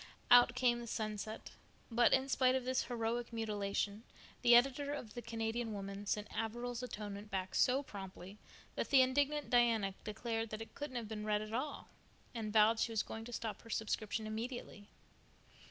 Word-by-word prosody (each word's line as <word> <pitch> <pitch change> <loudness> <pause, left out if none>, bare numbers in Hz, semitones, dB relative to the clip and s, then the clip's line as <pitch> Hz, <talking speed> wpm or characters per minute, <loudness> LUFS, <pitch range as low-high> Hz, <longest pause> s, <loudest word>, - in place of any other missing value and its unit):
Out 245 0 +8
came 245 -1 +3
the 235 - -7
sunset; 215 0 -4 0.4
but 235 +1 +5
in 265 0 +3
spite 260 -1 +3
of 260 -1 -1
this 255 0 +1
heroic 235 0 -2
mutilation 210 -2 -2 0.4
the 240 -1 +7
editor 275 +3 +3
of 225 -7 -7
the 240 - -5
Canadian 225 0 -2
Woman 200 0 -6
sent 210 +1 -1
Averil's 240 +2 -3
Atonement 210 -4 -6
back 190 -1 -3
so 260 +3 +3
promptly 195 -2 -9 0.3
that - - -2
the 265 -2 +7
indignant 285 +3 +1
Diana 230 -5 +3
declared 225 +1 -3
that 215 - -5
it - - -16
couldn't 290 -3 -6
have 235 -3 -3
been 210 0 -5
read 210 0 +1
at 215 +1 -8
all, 275 +5 -3 0.5
and 220 -3 -3
vowed 220 +1 +5
she 230 - +1
was 220 -2 +1
going 225 0 -7
to 245 - -8
stop 220 -3 -4
her 230 - -14
subscription 220 0 -2
immediately. 220 -1 -5
225 Hz, 175 wpm, -36 LUFS, 210-245 Hz, 0.5 s, Out